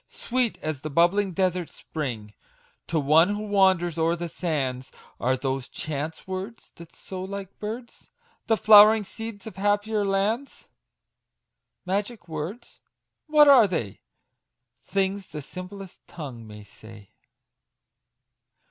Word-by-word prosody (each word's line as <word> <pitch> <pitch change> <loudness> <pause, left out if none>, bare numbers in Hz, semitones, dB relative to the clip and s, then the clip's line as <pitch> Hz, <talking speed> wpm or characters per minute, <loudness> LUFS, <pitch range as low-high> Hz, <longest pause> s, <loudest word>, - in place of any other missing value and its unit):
Sweet 245 -2 -2
as 155 -3 -3
the 155 - -5
bubbling 175 +6 +2
desert 180 -1 0
spring 115 -9 -6 0.5
To 160 - 0
one 160 +8 +4
who 210 - -4
wanders 190 -5 +2
o'er 165 +1 +2
the 175 0 -4
sands, 135 -7 -3 0.3
Are 130 +2 +1
those 135 -1 -3
chance 155 +1 -5
words, 190 +5 -7
that 170 -1 -13
sow 185 -1 -7
like 195 0 -7
birds 230 +3 -7 0.4
The 225 - +3
flowering 215 0 +8
seeds 225 0 -8
of 215 -4 -9
happier 205 +1 +1
lands! 200 +7 -2 1.2
Magic 205 +3 -3
words! 160 +8 -7 0.5
what 300 -1 +6
are 260 -7 +8
they? 140 - -4 0.8
Things 195 +6 -2
the 150 -1 -7
simplest 185 +4 -10
tongue 125 -9 -8
may 105 -1 -11
say 105 0 -15
185 Hz, 120 wpm, -25 LUFS, 155-205 Hz, 1.2 s, flowering